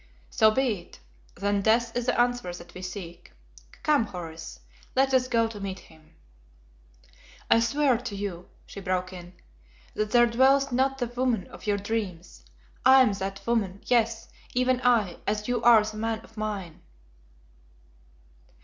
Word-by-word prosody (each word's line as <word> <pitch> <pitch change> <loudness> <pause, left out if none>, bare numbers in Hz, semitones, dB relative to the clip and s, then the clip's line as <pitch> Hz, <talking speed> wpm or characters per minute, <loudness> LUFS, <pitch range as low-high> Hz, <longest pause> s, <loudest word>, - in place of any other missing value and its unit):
"So 220 - +5
be 230 -3 0
it. 170 - -16 0.4
Then 200 +1 0
Death 230 +2 +2
is 245 0 -2
the 250 - +1
answer 245 -5 +1
that 175 0 -11
we 185 - -9
seek. 175 - -8 0.5
Come, 295 -6 +3
Horace, 165 - -8 0.4
let 265 0 +2
us 255 -1 +3
go 230 -2 +2
to 225 -2 -9
meet 195 -1 -5
him." 160 -3 -19 1.4
"I - - +7
swear 260 +1 +2
to 240 -4 -6
you," 195 -3 -5 0.2
she - - -9
broke 185 -1 -2
in, 175 0 -10 0.6
"that 215 0 -2
there 240 +2 +5
dwells 265 +3 +3
not 265 +2 +1
the 250 - -1
woman 245 -3 -1
of - - -12
your 205 -1 +2
dreams. 200 -4 -5 0.4
I 260 +1 +8
am 215 - +2
that 195 0 -5
woman, 205 -5 -1
yes, 230 -2 +1 0.3
even 255 0 +2
I, 225 -8 +2
as 210 0 -1
you 245 -2 0
are 235 -2 +7
the 215 0 -6
man 225 0 -2
of 225 - -19
mine." 205 -6 -5
220 Hz, 160 wpm, -26 LUFS, 190-245 Hz, 1.4 s, I